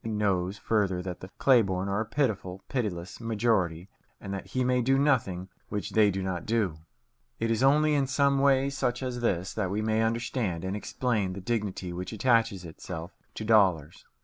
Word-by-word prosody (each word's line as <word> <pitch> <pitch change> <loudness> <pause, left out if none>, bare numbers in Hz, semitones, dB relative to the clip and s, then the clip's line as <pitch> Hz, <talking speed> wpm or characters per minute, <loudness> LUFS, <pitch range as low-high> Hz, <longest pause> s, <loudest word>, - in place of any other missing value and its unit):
He 115 - -4
knows 100 -3 0
further 100 -5 0
that 90 -2 -5
the 95 - -9
clay 130 -3 +5
born 95 -2 -2
are 100 +2 0
a 110 - -4
pitiful, 105 -8 -1
pitiless 100 -9 -3
majority, 105 -7 0 0.3
and 100 - -6
that 95 - -5
he 130 - -1
may 125 0 +2
do 135 +3 +3
nothing 115 -11 +1 0.2
which 105 -1 -3
they 110 -2 +5
do 95 -1 -2
not 95 -2 -3
do. 105 -8 0 0.6
It 115 0 -1
is 115 - +1
only 150 +3 +4
in 140 -2 +2
some 140 +1 +2
way 135 0 +3
such 125 -2 -1
as 125 -1 -3
this 95 -5 0
that 100 -4 -1
we 105 +3 -1
may 110 0 +1
understand 115 -6 -1
and 95 +2 -2
explain 105 -3 -1
the 95 - -6
dignity 100 -4 -3
which 90 +3 -5
attaches 115 -4 +2
itself 85 +1 -7 0.2
to 110 - -5
dollars. 95 -8 +3
105 Hz, 190 wpm, -28 LUFS, 95-120 Hz, 0.6 s, clay